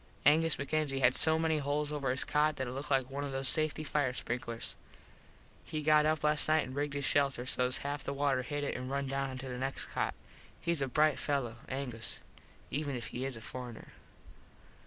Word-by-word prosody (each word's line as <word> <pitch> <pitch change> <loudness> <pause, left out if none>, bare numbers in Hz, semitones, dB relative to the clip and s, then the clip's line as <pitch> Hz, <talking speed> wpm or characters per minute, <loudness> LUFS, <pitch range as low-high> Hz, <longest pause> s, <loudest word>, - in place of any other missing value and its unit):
Angus 160 +2 +5
MacKenzie 140 -1 -1
had 125 -1 +5
so 160 +3 +6
many 160 -1 +1
holes 145 +1 -1
over 145 -3 -1
his 130 +1 +3
cot 150 +1 +2
that 130 - -2
it 120 - -5
looked 140 +3 -5
like 135 -2 +1
one 140 +1 -3
of 140 - -3
those 135 0 0
safety 155 0 +2
fire 145 -4 0
sprinklers. 115 -1 -3 0.9
He 155 -1 -4
got 155 0 +5
up 155 -1 +1
last 150 0 +3
nite 155 0 +3
and 130 - -8
rigged 145 0 -2
his 140 -1 -2
shelter 140 -4 +2
half 130 - -2
sos 125 0 +2 0.3
the - - -3
water 140 -2 +1
hit 145 +3 -3
it 145 - -1
an 125 0 -5
run 140 0 -1
down 135 0 -1
onto 130 0 -6
the 125 -1 -5
next 135 +1 -2
cot. - - -2 0.5
Hes 170 -3 +1
a 135 - +1
brite 150 +3 +3
fello, 130 -6 -1
Angus, 125 -4 -3 0.5
even 145 -1 -2
if 120 -3 -4
he 125 +2 -4
is 135 -3 -3
a - - -10
forener. 120 0 -8
140 Hz, 210 wpm, -32 LUFS, 130-150 Hz, 0.9 s, so